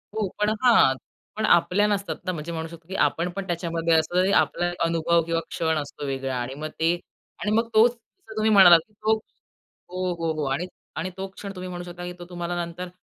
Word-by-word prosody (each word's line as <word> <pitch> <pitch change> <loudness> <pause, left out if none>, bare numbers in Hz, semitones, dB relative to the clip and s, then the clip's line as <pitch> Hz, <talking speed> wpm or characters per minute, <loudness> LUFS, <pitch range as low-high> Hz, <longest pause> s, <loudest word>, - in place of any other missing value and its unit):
हो, 215 -3 0
पण 210 0 +2
हां, 225 - +6 0.4
पण 220 - 0
आपल्या 180 +4 +4
नसतात 200 -1 -1
ना, 185 - 0
म्हणजे 165 0 -5
म्हणू 160 -1 -4
शकतो 165 0 -13
की 190 - -6
आपण 170 +2 -1
पण 195 -1 -3
त्याच्यामध्ये 170 -1 0
असतो 160 +2 +2
तरी 190 +2 +2
आपला 175 0 0
अनुभव 165 0 +2
किंवा 165 0 0
क्षण 160 -2 0
असतो 145 0 -5
वेगळा 135 -1 -2
आणि 125 +2 -4
मग - - -1
ते 165 +2 +3 0.5
आणि 210 - -1
मग 230 +1 +1
तोच 220 +2 +6
जसं 235 - -17
तुम्ही 215 0 +2
म्हणालात 180 -5 +9
की 210 - -31
तो 215 +1 +1 0.8
हो, 185 0 -2
हो, 165 -1 -1
हो 155 -1 -3
आणि 170 +6 -1 0.3
आणि 175 +3 -2
तो 190 0 -4
क्षण 195 +1 -8
तुम्ही 185 0 -6
म्हणू 175 0 -6
शकता 175 0 -8
की 180 - -5
तो 175 - -8
तुम्हाला 175 0 -3
नंतर 170 +2 -7
175 Hz, 215 wpm, -25 LUFS, 165-195 Hz, 0.8 s, म्हणालात